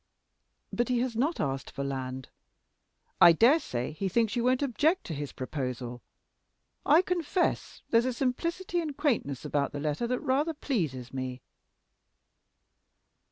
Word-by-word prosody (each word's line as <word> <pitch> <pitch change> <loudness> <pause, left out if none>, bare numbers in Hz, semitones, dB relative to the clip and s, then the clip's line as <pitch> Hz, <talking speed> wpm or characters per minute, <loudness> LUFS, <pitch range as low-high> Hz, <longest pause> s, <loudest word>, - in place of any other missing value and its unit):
"But 240 +1 0
he 250 - +2
has 250 -2 -2
not 290 +9 0
asked 135 -1 -2
for 140 - -5
land. 130 -1 -4 0.9
I 170 -1 +10
dare 245 - +5
say 125 - -3
he 190 +5 -3
thinks 225 +3 +1
you 240 - 0
won't 255 +2 +2
object 295 - +2
to 165 - -5
his 145 -1 -5
proposal. 125 -3 -5 0.9
I 315 +5 +6
confess 360 0 -1
there's 230 +1 +4
a 255 - 0
simplicity 335 +9 -1
and 300 -4 -5
quaintness 210 - 0
about 145 0 0
the 145 - -4
letter 150 +10 -1
that 250 +1 -1
rather 295 +5 +1
pleases 145 - -2
me." 130 -1 -5
230 Hz, 145 wpm, -29 LUFS, -, 0.9 s, I